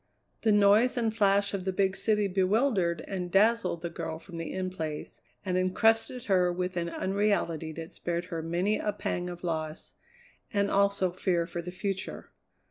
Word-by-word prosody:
The 220 Hz, -, +3 dB
noise 210 Hz, +5 st, +5 dB
and 225 Hz, -2 st, 0 dB
flash 200 Hz, -1 st, +3 dB
of 195 Hz, -2 st, -2 dB
the 190 Hz, -, -1 dB
big 190 Hz, 0 st, +1 dB
city 210 Hz, -1 st, +1 dB
bewildered 190 Hz, -, +1 dB
and 180 Hz, -2 st, -4 dB
dazzled 205 Hz, -3 st, +2 dB
the 170 Hz, -, -2 dB
girl 160 Hz, -, -4 dB
from 170 Hz, +1 st, -10 dB
the 165 Hz, -1 st, -4 dB
In 185 Hz, -1 st, -3 dB
Place 155 Hz, -4 st, -5 dB, 0.2 s
and 185 Hz, -1 st, +1 dB
encrusted 225 Hz, +6 st, +2 dB
her 180 Hz, -4 st, +3 dB
with 180 Hz, +1 st, -3 dB
an 170 Hz, -1 st, -1 dB
unreality 190 Hz, -5 st, 0 dB
that 165 Hz, +1 st, -8 dB
spared 175 Hz, 0 st, -3 dB
her 165 Hz, -, -2 dB
many 175 Hz, +6 st, 0 dB
a 210 Hz, -, -1 dB
pang 180 Hz, -3 st, -3 dB
of 175 Hz, 0 st, -8 dB
loss, 160 Hz, -2 st, -4 dB, 0.6 s
and 200 Hz, -1 st, +1 dB
also 200 Hz, -2 st, +2 dB
fear 175 Hz, -1 st, 0 dB
for 170 Hz, 0 st, -5 dB
the 175 Hz, -, -7 dB
future. 190 Hz, +1 st, -4 dB
185 Hz, 175 wpm, -29 LUFS, 175-205 Hz, 0.6 s, noise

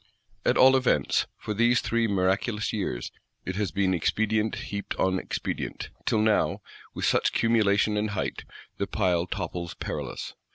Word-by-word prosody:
At -, -, +2 dB
all 130 Hz, +1 st, +7 dB
events, 125 Hz, -, +2 dB
for 105 Hz, -, -4 dB
these 120 Hz, +3 st, +3 dB
three 115 Hz, 0 st, +1 dB
miraculous 100 Hz, +2 st, 0 dB
years, 95 Hz, -, -3 dB, 0.3 s
it 95 Hz, -, -3 dB
has 105 Hz, -3 st, 0 dB
been 95 Hz, +3 st, +1 dB
expedient 110 Hz, +5 st, +1 dB
heaped 100 Hz, 0 st, -5 dB
on 95 Hz, 0 st, +1 dB
expedient; -, -, -4 dB, 0.2 s
till 110 Hz, -, +3 dB
now, 110 Hz, -1 st, +2 dB, 0.3 s
with -, -, -1 dB
such -, -, +2 dB
cumulation 105 Hz, -2 st, +3 dB
and 105 Hz, +1 st, 0 dB
height, 100 Hz, -, -3 dB, 0.4 s
the 100 Hz, -, -1 dB
pile 90 Hz, -4 st, +1 dB
topples 85 Hz, -1 st, -4 dB
perilous. -, -, -5 dB
105 Hz, 150 wpm, -27 LUFS, 95-110 Hz, 0.4 s, all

